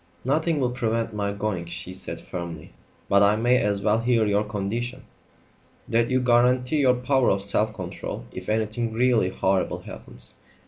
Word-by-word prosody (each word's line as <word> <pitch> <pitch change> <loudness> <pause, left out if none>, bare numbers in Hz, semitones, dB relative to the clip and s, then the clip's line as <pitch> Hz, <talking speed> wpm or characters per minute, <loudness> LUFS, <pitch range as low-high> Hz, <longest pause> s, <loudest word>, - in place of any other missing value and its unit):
"Nothing 155 +3 +1
will 125 -2 +1
prevent 115 -2 -1
my 100 -1 -1
going," 100 -4 -3
she 90 +2 -6
said 95 - -6
firmly; 85 -2 -7 0.3
"but 100 0 +4
I 100 +1 +5
may 120 +3 +3
as 100 -1 0
well 110 +1 +3
hear 115 -1 +2
your 105 0 +2
condition." 115 +5 -3 0.8
"That 115 +1 +2
you 130 0 +2
guarantee 125 +3 +3
your 130 -3 +4
power 130 0 +2
of 100 - +1
self 105 +2 +2
control 90 -9 -6
if - - -7
anything 110 +1 -1
really 120 -5 +3
horrible 95 0 0
happens. - - -4
110 Hz, 165 wpm, -25 LUFS, 100-125 Hz, 0.8 s, I